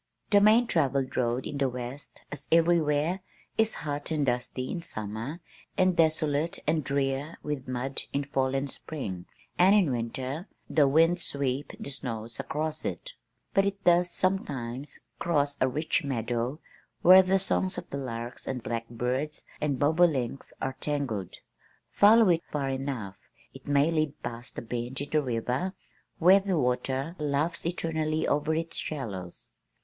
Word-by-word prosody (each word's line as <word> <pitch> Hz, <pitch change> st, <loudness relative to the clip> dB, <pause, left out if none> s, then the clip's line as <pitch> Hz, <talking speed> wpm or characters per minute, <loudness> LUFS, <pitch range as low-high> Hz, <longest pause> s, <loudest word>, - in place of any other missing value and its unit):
"The 205 Hz, -1 st, +6 dB
main 220 Hz, +4 st, +6 dB
travelled 140 Hz, -, 0 dB
road 120 Hz, +1 st, 0 dB
in 145 Hz, -, -4 dB
the 135 Hz, -1 st, +2 dB
west 125 Hz, +3 st, -7 dB
(as 145 Hz, -, -8 dB
everywhere) 165 Hz, 0 st, +3 dB, 0.4 s
is 220 Hz, 0 st, +2 dB
hot 145 Hz, -1 st, -3 dB
and 155 Hz, -3 st, +1 dB
dusty 125 Hz, +1 st, -2 dB
in 170 Hz, -, -3 dB
summer 110 Hz, -, -5 dB, 0.4 s
and 185 Hz, -1 st, +4 dB
desolate 155 Hz, -1 st, +2 dB
and 155 Hz, 0 st, +1 dB
drear 140 Hz, +3 st, -1 dB
with 145 Hz, -3 st, -4 dB
mud 130 Hz, +2 st, -2 dB
in 140 Hz, -, 0 dB
fall 135 Hz, -1 st, 0 dB
and 135 Hz, +1 st, 0 dB
spring, 105 Hz, -, -6 dB, 0.3 s
and 190 Hz, +3 st, +7 dB
in 185 Hz, -9 st, +4 dB
winter 130 Hz, -, -3 dB, 0.2 s
the 145 Hz, -3 st, +4 dB
winds 165 Hz, +5 st, +4 dB
sweep 140 Hz, -2 st, -2 dB
the 140 Hz, -, -6 dB
snows 115 Hz, -4 st, -5 dB
across 155 Hz, 0 st, -2 dB
it, -, -, -4 dB, 0.4 s
but 195 Hz, -, +4 dB
it 200 Hz, 0 st, -2 dB
does 175 Hz, 0 st, +4 dB
sometimes 140 Hz, -9 st, -2 dB, 0.2 s
cross 145 Hz, -4 st, +1 dB
a 130 Hz, -, +5 dB
rich 155 Hz, +5 st, 0 dB
meadow 120 Hz, +1 st, -2 dB, 0.4 s
where 185 Hz, +2 st, +10 dB
the 190 Hz, +1 st, +2 dB
songs 190 Hz, 0 st, 0 dB
of -, -, -6 dB
the 140 Hz, -, -3 dB
larks 120 Hz, -2 st, -6 dB
and 125 Hz, -3 st, -3 dB
blackbirds 125 Hz, +6 st, -3 dB, 0.2 s
and 145 Hz, -3 st, 0 dB
bobolinks 145 Hz, -4 st, +2 dB
are 130 Hz, 0 st, -3 dB
tangled. 130 Hz, -, -2 dB, 0.6 s
Follow 215 Hz, 0 st, +6 dB
it 170 Hz, -1 st, +3 dB
far 140 Hz, -2 st, -1 dB
enough, 130 Hz, -8 st, -3 dB, 0.4 s
it -, -, -13 dB
may 145 Hz, +2 st, +3 dB
lead 155 Hz, -2 st, 0 dB
past 120 Hz, 0 st, -6 dB
a -, -, -4 dB
bend 120 Hz, +2 st, -4 dB
in 145 Hz, -, -5 dB
the 155 Hz, -, +3 dB
river 125 Hz, +7 st, -1 dB, 0.4 s
where 185 Hz, +4 st, +7 dB
the 190 Hz, -3 st, -1 dB
water 130 Hz, +4 st, 0 dB
laughs 150 Hz, +3 st, 0 dB
eternally 160 Hz, -2 st, -1 dB
over 150 Hz, +2 st, +1 dB
its 165 Hz, +1 st, -3 dB
shallows. 100 Hz, -, -5 dB
145 Hz, 155 wpm, -28 LUFS, 125-165 Hz, 0.6 s, where